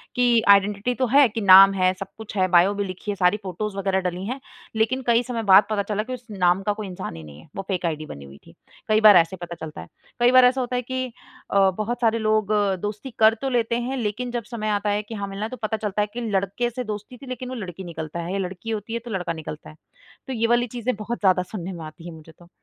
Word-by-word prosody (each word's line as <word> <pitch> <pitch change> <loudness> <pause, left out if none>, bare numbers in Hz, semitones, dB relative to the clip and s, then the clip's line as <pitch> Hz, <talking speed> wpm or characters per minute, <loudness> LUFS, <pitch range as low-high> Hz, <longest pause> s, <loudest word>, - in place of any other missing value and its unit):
कि 240 -2 +4
आइडेंटिटी 200 +4 +4
तो 255 - +1
है, 275 +2 +6
कि 225 +1 -4
नाम 195 0 +9
है, 185 -1 +2
सब 195 - -5
कुछ 220 -1 -9
है 185 0 +3
बायो 185 +4 +5
भी 205 0 -2
लिखी 185 +3 -5
है, - - -3
सारी 185 +2 +2
फ़ोटोज़ 195 +2 -4
वगैरह 195 -1 0
डली 180 +2 -6
है। 255 +5 -4 0.4
लेकिन 240 +4 +1
कई 235 +1 +4
समय 235 -3 -4
बाद 195 0 +7
पता 205 -2 0
चला 210 +1 -2
कि 255 +2 -6
उस 245 -1 -8
नाम 180 -1 +2
का 210 0 0
कोई 210 -1 -6
इंसान 180 - -6
ही 80 - -9
नहीं 75 -1 -12
है, - - -17
वो - - -3
फेक 185 -3 -2
आईडी 155 -2 -2
बनी 70 - -10
हुई 70 +1 -13
थी। - - -16 0.3
कई 215 0 +3
बार 210 -2 +9
ऐसे 165 +2 +2
पता 170 0 -6
चलता 155 -1 -7
है। - - -11 0.3
कई 240 +1 +5
बार 255 -1 +7
ऐसा 260 +1 +3
होता 250 0 -3
है 250 - 0
कि 260 +1 -3 0.5
अ, 195 -1 +4
बहुत 235 +3 -3
सारे 230 0 +2
लोग 215 -1 +1 0.3
दोस्ती 210 +5 -5
कर 220 0 +6
तो 270 - -1
लेते 235 -2 0
हैं, 265 0 -3
लेकिन 240 +2 -3
जब 240 -2 -3
समय 215 -2 -3
आता 205 0 0
है 205 +1 0
कि 225 +2 -8
हाँ, 200 -1 -4
मिलना 195 +2 -4
तो 255 - -8
पता 220 +1 -1
चलता 210 -1 -2
है 205 - 0
कि 245 - -4
लड़के 200 +5 -1
से 250 +2 -5
दोस्ती 210 +2 -7
थी, 270 - -13
लेकिन 255 0 -6
वो 255 - -5
लड़की 190 -5 -7
निकलता 165 -1 -6
है 170 +2 -5
या 200 - -1
लड़की 190 +5 -9
होती 220 +1 -4
है, 235 - -1
तो 235 0 -10
लड़का 180 -4 -2
निकलता 155 -1 -8
है। 155 - -14 0.5
तो 265 - -4
ये 230 -1 0
वाली 240 +1 +2
चीज़ें 240 0 -1
बहुत 220 +3 -5
ज़्यादा 185 -2 +3
सुनने 190 -3 -5
में 170 - -8
आती 155 +2 -12
हैं, 170 - -8
मुझे 160 +1 -14
तो। 175 -1 -17
210 Hz, 275 wpm, -23 LUFS, 185-235 Hz, 0.5 s, नाम